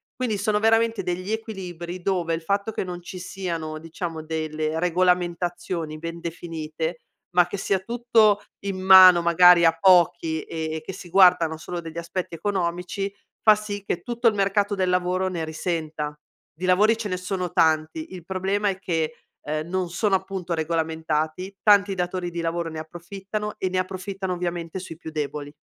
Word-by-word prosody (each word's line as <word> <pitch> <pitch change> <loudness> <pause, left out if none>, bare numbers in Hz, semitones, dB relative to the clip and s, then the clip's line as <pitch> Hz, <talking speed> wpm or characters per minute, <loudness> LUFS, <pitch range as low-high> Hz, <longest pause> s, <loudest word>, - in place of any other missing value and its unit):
Quindi, 235 -5 -1
sono 210 0 +1
veramente 225 0 +3
degli 185 +3 -3
equilibri 185 -5 -5
dove, 175 -3 0
il 165 - -2
fatto 200 +5 -1
che - - -2
non 180 -1 -6
ci 185 - -8
siano, 170 -4 -4
diciamo, 165 0 -5
delle 155 0 -2
regolamentazioni 175 -2 0
ben 165 +1 -6
definite, 165 -1 -5 0.4
ma 180 -1 +5
che 180 - -5
sia 195 0 0
tutto 225 -1 +3 0.2
in 195 -1 -3
mano, 185 -2 +9
magari, 170 +1 +6
a 165 0 +5
pochi, 170 -3 +4
e 160 0 -4
e 160 - -4
che 160 - -7
si 190 -1 -10
guardano 180 -3 +5
solo 175 +2 -6
degli 165 -1 -8
aspetti 170 +1 -4
economici, 180 +1 -2 0.3
fa 215 -1 +7
sì 205 -1 -5
che 175 - -2
tutto 240 0 0
il 225 - +5
mercato 200 +1 +1
del 185 -2 0
lavoro 180 +1 +1
ne 170 -3 -3
risenta. 155 -2 -3 0.4
Di 175 +4 -5
lavori 210 +5 +4
ce 225 -2 -4
ne 180 - -1
sono 180 -1 -3
tanti, 160 - +1
il 180 -3 -8
problema 195 +2 0
è 190 - -2
che, 165 -4 -1 0.3
ehm, 155 +1 -3
non 185 0 -2
sono 195 +4 0
appunto 190 -2 -3
regolamentati, 160 +2 -2
tanti 200 -2 +5
datori 180 0 -2
di 170 - -4
lavoro 165 0 -2
ne 160 - -7
approfittano, 195 +6 -6
e 185 - -1
ne 185 0 0
approfittano 190 0 -4
ovviamente 175 -1 -4
sui 170 -3 -9
più 160 - -8
deboli. 145 -1 -4
180 Hz, 170 wpm, -24 LUFS, 165-195 Hz, 0.4 s, mano